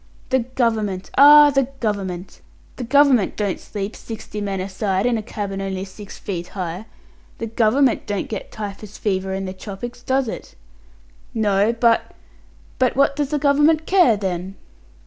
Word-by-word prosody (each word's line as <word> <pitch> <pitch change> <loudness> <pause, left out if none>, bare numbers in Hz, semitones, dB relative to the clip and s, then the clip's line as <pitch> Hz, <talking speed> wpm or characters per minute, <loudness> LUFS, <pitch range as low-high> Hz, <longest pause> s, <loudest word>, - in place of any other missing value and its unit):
"The 260 - +3
Government! 225 -6 -1
Ah! 295 +1 +9
The 270 -2 +2
Government! 195 -4 -3 0.4
The 255 - -4
Government 260 -4 +4
don't 200 -3 -1
sleep, 205 0 -6
sixty 215 -2 -7
men 195 -2 -2
a 185 - -3
side, 195 0 -1
in 245 -1 +2
a 220 - -1
cabin 200 -3 -5
only 190 -1 -3
six 200 +1 -11
feet 175 -3 -5
high. 180 +3 -4 0.5
The 230 - -4
Government 230 +4 +2
don't 205 -2 -2
get 210 - -6
typhus 210 -1 -7
fever 190 -2 -1
in 195 0 -3
the 185 - -5
tropics, 215 +5 -8
does 265 +1 0
it?" - - -7 0.8
"No 205 -1 +2
but 235 0 +1 0.3
" - - -29
"But 255 -1 +2
what 280 +1 +3
does 290 -2 -1
the 300 - 0
Government 295 +2 +3
care, 355 - +4
then?" 190 -1 -4
215 Hz, 165 wpm, -21 LUFS, 195-255 Hz, 0.8 s, Ah